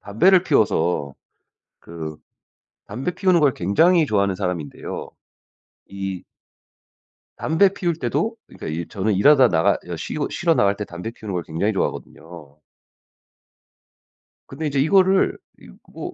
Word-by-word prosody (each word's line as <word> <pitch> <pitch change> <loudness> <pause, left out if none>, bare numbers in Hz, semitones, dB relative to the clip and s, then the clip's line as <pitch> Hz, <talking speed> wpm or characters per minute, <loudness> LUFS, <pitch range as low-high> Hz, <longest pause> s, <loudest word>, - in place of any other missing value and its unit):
담배를 180 - +3
피워서 90 - +1 0.7
그 80 -2 -8 0.7
담배 130 +12 -4
피우는 185 -3 +2
걸 140 -4 +3
굉장히 160 - +3
좋아하는 100 -4 +1
사람인데요. 90 -7 -5 0.8
이 95 -2 -6 1.1
담배 165 +5 +3
피울 175 -4 -1
때도 155 - -2
그러니까 - - -10
이 80 +2 -4
저는 105 +1 -1
일하다 130 +5 +5
나가 80 -1 +2
가 90 0 -7
쉬 80 - -6
쉬러 170 -2 +1
나갈 100 -8 +2
때 105 - -5
담배 90 +6 -7
피우는 110 -4 -8
걸 90 -2 -2
굉장히 85 +7 -2
좋아하거든요. 80 -5 -6 1.9
근데 150 +4 -6
이제 140 -1 -1
이거를 190 +6 +3 0.2
이 - - -16 0.2
뭐 - - -7
105 Hz, 280 characters per minute, -22 LUFS, -, 1.9 s, 일하다